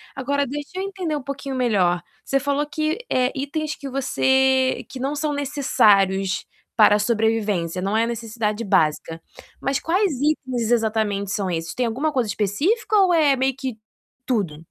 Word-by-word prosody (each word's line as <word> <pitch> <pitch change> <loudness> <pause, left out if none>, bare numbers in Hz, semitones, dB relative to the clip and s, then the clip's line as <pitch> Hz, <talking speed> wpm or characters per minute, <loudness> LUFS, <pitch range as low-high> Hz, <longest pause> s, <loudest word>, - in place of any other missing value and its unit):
Agora 280 +1 0
deixa 290 +2 -5
eu - - -2
entender 370 -5 -3
um 290 - -4
pouquinho 275 0 -5
melhor, 195 -9 +2 0.2
você 275 - +1
falou 285 +1 0
que, 310 +3 -1
eh, 255 0 +2
itens 300 +3 -3
que 280 - -8
você 265 0 +2
que 260 - -8
não 275 +3 -1
são 300 0 -1
necessários 200 -9 +2 0.3
para 210 -2 +6
a 210 - +1
sobrevivência, 210 -6 0
não 200 +3 0
é 225 - +3
a - - 0
necessidade 225 -1 -3
básica, 160 -3 +1 0.4
mas 275 0 0
quais 370 +3 +1
itens 260 -6 0
exatamente 215 -4 0
são 195 -2 -1
esses? 165 -1 -3
Tem 250 - 0
alguma 265 +7 -1
coisa 250 -5 0
específica 285 - 0
ou 380 -3 +4
é 300 -4 +4
meio 265 0 0
que 260 -4 -5 0.5
tudo? 195 - -1
255 Hz, 165 wpm, -22 LUFS, 210-285 Hz, 0.5 s, para